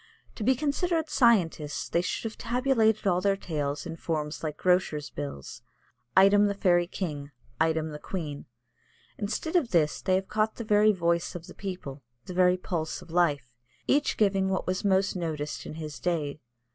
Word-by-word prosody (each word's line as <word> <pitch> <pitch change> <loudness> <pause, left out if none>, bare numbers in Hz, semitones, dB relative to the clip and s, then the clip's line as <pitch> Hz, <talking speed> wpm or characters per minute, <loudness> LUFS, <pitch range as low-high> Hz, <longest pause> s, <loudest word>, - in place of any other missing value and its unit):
To 220 - -6
be 260 +5 +4
considered 315 +3 -1
scientists 180 - +2
they 170 - +1
should 180 - -3
have 225 -1 -4
tabulated 235 -4 +1
all 180 -2 +2
their 195 0 +2
tales 150 -5 -3
in 165 -1 -5
forms 155 -3 -3
like 150 -1 -3
grocers' 180 -5 +1
bills 140 - -7 0.6
item 200 +2 +6
the 200 - -1
fairy 175 -3 +3
king, 150 -7 -4 0.3
item 160 0 +1
the 150 - -7
queen. 150 -5 -5 0.7
Instead 220 - -3
of 310 -9 +3
this 155 -4 +2
they 185 - +2
have 190 0 -1
caught 215 +1 0
the 235 - -5
very 215 0 +4
voice 170 -2 0
of 175 -1 -7
the - - -11
people, 180 -8 -6 0.2
the 180 - -7
very 180 0 +4
pulse 165 -3 -3
of 165 - -15
life, 145 -8 +1 0.3
each 290 +1 +2
giving 195 -2 +2
what 190 - -1
was 185 +1 -2
most 195 -1 +2
noticed 155 -4 -4
in - - -7
his 155 -3 -7
day. 155 -5 -2
180 Hz, 175 wpm, -28 LUFS, 155-205 Hz, 0.7 s, item